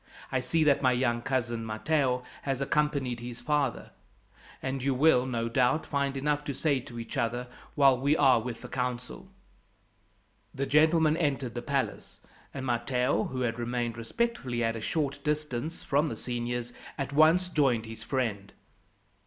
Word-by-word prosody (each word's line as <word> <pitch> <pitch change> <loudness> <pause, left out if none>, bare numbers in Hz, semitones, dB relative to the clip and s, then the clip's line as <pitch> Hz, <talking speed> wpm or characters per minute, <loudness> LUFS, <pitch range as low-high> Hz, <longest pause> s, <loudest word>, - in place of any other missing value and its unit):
"I 130 - +1
see 130 +6 +1
that 145 -2 +4
my 130 -2 +4
young 120 -1 +1
cousin, 120 -3 -1
Matteo, 125 +3 0 0.2
has 135 -2 -2
accompanied 140 -3 0
his 120 0 -7
father, 140 -1 -1 0.7
and 130 0 -3
you 135 0 +1
will, 130 -2 +4
no 115 -2 -1
doubt, 125 +5 +2
find 140 -1 -1
enough 145 +1 0
to 140 - -3
say 140 -1 +1
to 120 -1 -10
each 115 - -6
other 120 +2 -1 0.3
while 140 -2 +6
we 140 +4 +2
are 130 -4 +5
with 115 0 -6
the - - -8
council." 125 -1 -4 1.3
The 135 - -1
gentlemen 155 +2 +4
entered 135 -7 -1
the 120 - -4
palace, 135 +1 -3 0.3
and 130 -1 -5
Matteo, 125 +1 +1
who 130 -1 -4
had 120 -1 -1
remained 120 -1 -2
respectfully 125 - -2
at 115 0 0
a 115 - -5
short 140 +2 -2
distance 150 0 -2
from 150 +2 +1
the - - -4
seniors, 120 0 -4 0.2
at 140 -1 -3
once 160 +5 +5
joined 135 -9 +2
his 110 0 -8
friend. 115 -8 -2
130 Hz, 160 wpm, -29 LUFS, 120-145 Hz, 1.3 s, while